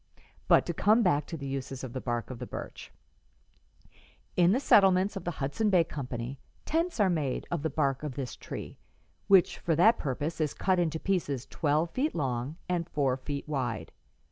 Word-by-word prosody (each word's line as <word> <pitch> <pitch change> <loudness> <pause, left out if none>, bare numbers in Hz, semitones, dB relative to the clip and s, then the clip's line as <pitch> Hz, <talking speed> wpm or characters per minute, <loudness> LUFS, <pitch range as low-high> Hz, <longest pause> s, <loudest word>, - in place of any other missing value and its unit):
But - - +5
to - - -2
come 220 +3 +4
back 150 -6 +2
to 165 - -5
the 140 - -7
uses 135 -1 -4
of 125 -2 -6
the 130 - -4
bark 120 0 -3
of 125 - -7
the - - -6
birch: - - -8 1.4
"'In 175 0 +5
the 240 - +3
settlements 195 -5 +4
of 195 - -6
the - - 0
Hudson 145 +11 0
Bay 180 -4 +5
Company 130 -4 -5 0.3
tents 330 -2 -1
are 205 - +5
made 155 -8 -1
of 170 -4 -1
the 160 - -1
bark 140 -4 0
of 150 -4 -5
this 135 -3 -4
tree, - - -8 0.5
which 195 -3 +5
for 165 - 0
that 220 +9 +5
purpose 150 +4 -3
is 150 -2 -1
cut 185 -1 +1
into 160 -2 0
pieces 145 -10 -1
twelve 155 +2 0
feet 285 - -1
long 130 -1 -2
and 175 -1 -1
four 135 -4 +1
feet 140 +2 -5
wide. 120 - -3
150 Hz, 190 wpm, -29 LUFS, 135-180 Hz, 1.4 s, But